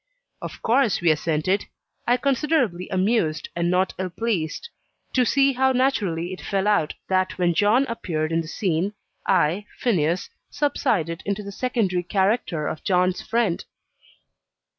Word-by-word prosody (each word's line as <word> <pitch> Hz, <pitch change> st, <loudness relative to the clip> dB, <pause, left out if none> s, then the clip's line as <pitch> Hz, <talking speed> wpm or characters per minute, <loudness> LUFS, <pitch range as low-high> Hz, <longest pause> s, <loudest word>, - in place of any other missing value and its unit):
Of -, -, -8 dB
course 235 Hz, -2 st, +3 dB
we 170 Hz, -2 st, +4 dB
assented: 160 Hz, +5 st, 0 dB, 0.4 s
I 245 Hz, +1 st, +4 dB
considerably 260 Hz, -, 0 dB
amused, 185 Hz, -5 st, 0 dB
and 170 Hz, 0 st, 0 dB
not 185 Hz, +1 st, +1 dB
ill 185 Hz, -1 st, -2 dB
pleased, 195 Hz, -, -2 dB, 0.5 s
to 250 Hz, -1 st, +3 dB
see 275 Hz, 0 st, +3 dB
how 265 Hz, +1 st, +2 dB
naturally 195 Hz, -10 st, 0 dB
it 185 Hz, -, -8 dB
fell 195 Hz, 0 st, -1 dB
out 205 Hz, -8 st, +2 dB
that 185 Hz, 0 st, 0 dB
when 175 Hz, -2 st, +2 dB
John 210 Hz, +9 st, +3 dB
appeared 165 Hz, -, -3 dB
in 165 Hz, 0 st, +1 dB
the 160 Hz, -, -8 dB
scene, 185 Hz, +2 st, -1 dB, 0.3 s
I, 185 Hz, +3 st, +2 dB
Phineas, 175 Hz, -7 st, 0 dB, 0.2 s
subsided 205 Hz, -, 0 dB
into 200 Hz, +1 st, -2 dB
the 200 Hz, -, -7 dB
secondary 205 Hz, -6 st, 0 dB
character 190 Hz, -3 st, 0 dB
of 155 Hz, -, -5 dB
John's 180 Hz, -1 st, +2 dB
"friend." 225 Hz, -7 st, 0 dB
190 Hz, 140 wpm, -24 LUFS, 170-235 Hz, 0.5 s, we